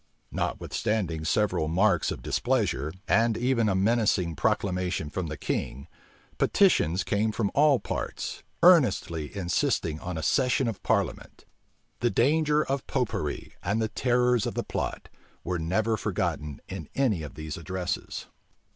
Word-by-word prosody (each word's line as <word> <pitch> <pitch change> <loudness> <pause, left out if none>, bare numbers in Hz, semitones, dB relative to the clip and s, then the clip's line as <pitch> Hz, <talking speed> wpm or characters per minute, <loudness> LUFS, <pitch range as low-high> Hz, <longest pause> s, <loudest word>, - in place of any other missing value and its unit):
Notwithstanding 90 -8 -2
several 90 -4 +1
marks 90 +2 +2
of - - -5
displeasure, 70 +4 0 0.2
and 115 +3 +3
even 120 -3 +2
a 95 - +1
menacing 100 -4 +2
proclamation 90 -3 -1
from 95 -3 -3
the 75 -1 -5
king, 70 +5 -3 0.5
petitions 100 - +3
came 110 +1 0
from 105 -2 -1
all 145 -2 +5
parts, - - -4 0.2
earnestly 100 - +4
insisting 85 -3 0
on 90 0 -5
a 80 - -4
session 130 - +2
of 115 - -4
parliament. - - -2 0.5
The 120 - +2
danger 150 +5 +2
of 135 -1 -2
Popery, - - -2
and 100 +4 0
the 110 -1 0
terrors 125 -1 +2
of - - -4
the - - -1
plot, - - -4 0.4
were 90 0 -2
never 105 +7 0
forgotten 75 -6 -2
in - - -7
any 120 -11 +1
of 75 - -8
these 75 0 -5
addresses. 90 +1 -4
100 Hz, 140 wpm, -27 LUFS, 85-120 Hz, 0.5 s, all